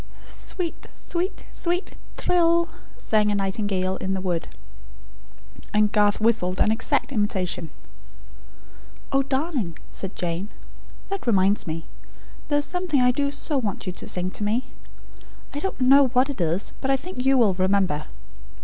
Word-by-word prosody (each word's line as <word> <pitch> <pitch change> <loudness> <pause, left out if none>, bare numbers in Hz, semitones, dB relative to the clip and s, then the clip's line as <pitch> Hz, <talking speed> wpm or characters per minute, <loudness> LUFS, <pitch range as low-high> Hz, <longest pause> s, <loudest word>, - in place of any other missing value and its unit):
"Sweet, 350 -4 -5
sweet, 360 +3 -3
sweet 355 +2 -2 0.3
thrill," 340 -1 +3 0.3
sang 210 -1 +2
a 205 - +1
nightingale 195 -1 0
in 190 0 -2
the - - -2
wood. 180 -3 -2 1.3
And 210 0 +4
Garth 205 -1 +3
whistled 210 -5 +2
an 215 - +4
exact 225 +5 +1
imitation. 190 - 0 1.4
"Oh, 275 - +4
darling," 265 - -1
said 190 0 -4
Jane, 175 +3 -2 0.6
"that 395 -8 -4
reminds 200 -3 +3
me; 165 +1 -4 0.6
there 290 - +2
is 290 - +1
something 355 -5 0
I 250 0 +5
do 280 +2 0
so 285 0 -1
want 205 -7 -3
you 185 - -3
to - - -6
sing 180 0 0
to 210 - -5
me. 225 +5 0 0.8
I 285 - -3
don't 385 -1 -3
know 270 +2 +6
what 255 +3 +2
it 250 - -5
is; 170 +4 0
but 265 - -1
I 270 - +4
think 325 -2 -5
you 270 0 +4
will 220 -6 +5
remember. 185 -5 +1
220 Hz, 150 wpm, -24 LUFS, 190-280 Hz, 1.4 s, know